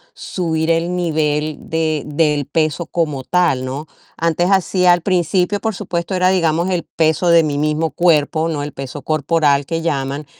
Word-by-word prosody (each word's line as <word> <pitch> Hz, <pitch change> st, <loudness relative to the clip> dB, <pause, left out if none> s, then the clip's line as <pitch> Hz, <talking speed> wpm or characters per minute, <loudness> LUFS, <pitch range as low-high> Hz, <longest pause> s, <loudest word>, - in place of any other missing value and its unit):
subir 160 Hz, -3 st, -2 dB
el 170 Hz, +2 st, 0 dB
nivel 155 Hz, -3 st, -1 dB
de 160 Hz, -2 st, -1 dB
del 150 Hz, -1 st, 0 dB
peso 155 Hz, +3 st, -1 dB
como 150 Hz, -7 st, -2 dB
tal, 170 Hz, -8 st, +1 dB
¿no? 140 Hz, +4 st, -5 dB, 0.3 s
Antes 170 Hz, +2 st, +1 dB
hacía, 185 Hz, -1 st, +3 dB
al 175 Hz, -, 0 dB
principio, 180 Hz, +2 st, +1 dB
por 220 Hz, +1 st, -2 dB
supuesto, 170 Hz, +1 st, -4 dB
era, 185 Hz, 0 st, +3 dB
digamos, 170 Hz, -1 st, +1 dB
el 180 Hz, -2 st, -1 dB
peso 160 Hz, +2 st, 0 dB
de 170 Hz, -1 st, +6 dB
mi 145 Hz, -2 st, -2 dB
mismo 155 Hz, +2 st, 0 dB
cuerpo, 160 Hz, -1 st, +2 dB
¿no? 150 Hz, -3 st, -2 dB
El 145 Hz, -, -6 dB
peso 135 Hz, +1 st, -7 dB
corporal 150 Hz, -1 st, +1 dB
que 165 Hz, +2 st, -3 dB
llaman. 140 Hz, -2 st, -2 dB
160 Hz, 165 wpm, -18 LUFS, 150-175 Hz, 0.3 s, de